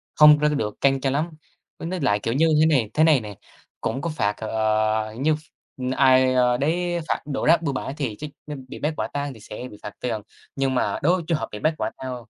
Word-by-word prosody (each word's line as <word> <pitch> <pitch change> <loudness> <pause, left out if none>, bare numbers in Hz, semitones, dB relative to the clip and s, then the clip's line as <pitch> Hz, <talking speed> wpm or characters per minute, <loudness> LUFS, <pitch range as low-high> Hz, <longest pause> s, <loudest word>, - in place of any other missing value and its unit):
không 150 -1 +8
có 150 - +4
được 140 -8 -2
căng 135 -1 +3
cho 135 - +1
lắm. 150 +5 0 0.5
Với 165 - -5
với 185 -1 -3
lại, 105 -6 +2
kiểu, 115 +3 -2
như 160 +5 +3
thế - - +6
này 130 -9 +2
thế 155 - +3
này 155 -6 +5
nè, 105 -2 -8 0.5
cũng 135 - -2
có 170 - -2
phạt, 105 -10 0
ờ, 110 0 0
như 155 +2 +2
ph - - -9 0.6
ai 130 -1 +5 0.2
đấy 175 +4 0
phạt - - -1
đổ 140 -2 -3
rác 165 +1 +5
bừa 145 -4 -1
bãi 135 +1 -4
thì 125 -8 -2
chắc 150 0 -5 0.2
nên 140 -3 -7
bị - - -9
bắt 155 +1 -1
quả - - -1
tang 145 -1 -3
thì 110 - -14
sẽ 110 +4 -8
bị 105 - -12
phạt 105 - -6
tiền, 115 -4 -2 0.3
nhưng 135 -1 0
mà - - 0
đối 175 +4 +4
với 175 - -4
trường 165 -3 +1
hợp - - -4
bị 105 - -6
bắt 155 +1 +1
quả - - -2
tang 130 -1 -5
135 Hz, 250 wpm, -23 LUFS, 110-155 Hz, 0.6 s, không